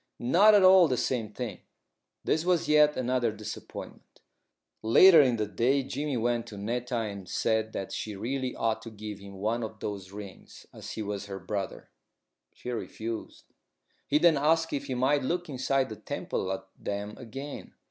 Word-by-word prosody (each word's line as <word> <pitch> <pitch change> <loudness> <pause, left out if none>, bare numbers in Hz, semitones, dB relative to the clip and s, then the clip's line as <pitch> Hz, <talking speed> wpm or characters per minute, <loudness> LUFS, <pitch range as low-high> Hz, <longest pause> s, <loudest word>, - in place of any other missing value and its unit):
"Not 190 - +5
at 200 - +6
all 185 -2 +8
the 130 -3 0
same 115 -5 -1
thing." 115 +2 -5 0.6
This 160 - +1
was 175 -2 +1
yet 150 0 +5
another 125 -2 +1
disappointment. 105 0 -9 0.6
Later 160 +9 +8
in 125 -4 +3
the 110 -2 -1
day 120 +7 +1
Jimmy 145 0 -3
went 120 0 0
to 105 - -9
Netta 120 +5 -3
and 100 -5 -4
said 110 0 0
that 95 - -4
she 105 -2 -4
really 130 +5 -3
ought 110 -1 0
to 115 - -8
give 105 -2 -8
him 100 0 -11
one 110 +5 -1
of 110 0 -7
those 100 -3 -5
rings 100 -2 -11
as - - -8
he 110 - -4
was 100 -1 -4
her 100 -1 -5
brother. 100 -1 -5 0.6
She 125 - -6
refused. 115 -1 -6 0.6
He 145 - +3
then 165 -1 +5
asked 160 +3 +2
if 140 - -2
he 130 - -3
might 135 +3 +2
look 175 +6 -2
inside 135 0 0
the 110 - -7
temple 95 - -3
at 95 0 -4
them 100 +1 -4
again. 135 +4 -8
120 Hz, 175 wpm, -28 LUFS, 105-140 Hz, 0.6 s, all